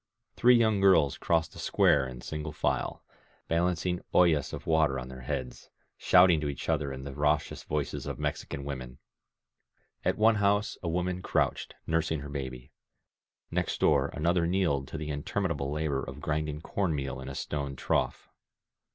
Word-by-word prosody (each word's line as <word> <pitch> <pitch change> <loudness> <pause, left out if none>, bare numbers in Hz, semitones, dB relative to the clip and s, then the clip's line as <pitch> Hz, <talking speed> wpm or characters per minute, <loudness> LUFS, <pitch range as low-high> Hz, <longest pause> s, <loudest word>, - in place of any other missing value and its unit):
Three 125 +1 +6
young 110 -4 +3
girls 90 -8 +5
crossed 80 0 0
the - - -11
square 70 -2 +3
in 65 -1 -9
single 75 +2 -5
file, 75 - -1 0.4
balancing 90 +1 0
oIUm 80 -6 +4
of - - -7
water 80 -4 +2
on 65 0 -6
their 65 0 -9
heads, 60 0 -5 0.3
shouting 90 -3 +5
to 75 - -1
each 70 - -5
other 70 -2 0
in 65 0 -6
the 70 0 -6
raucous 75 +1 0
voices 75 -1 -3
of - - -4
Mexican 70 - -4
women. 65 -3 -6 1.1
At - - +1
one 110 +1 +4
house 105 +1 +2
a 85 - -2
woman 90 +2 -1
crouched, - - -1
nursing 80 -2 0
her 70 - -7
baby; 65 -2 -6 0.8
next - - -1
door - - +3
another 85 +3 +1
kneeled 85 -7 +1
to - - -6
the 75 -1 -4
interminable 75 -1 -2
labor 75 -3 -1
of 70 - -7
I - - -11
grinding 75 0 -2
corn 90 -2 -1
meal 70 -2 -4
in 65 - -7
a 65 - -7
stone 70 -2 -3
trough. - - -1
75 Hz, 170 wpm, -29 LUFS, 70-85 Hz, 1.1 s, Three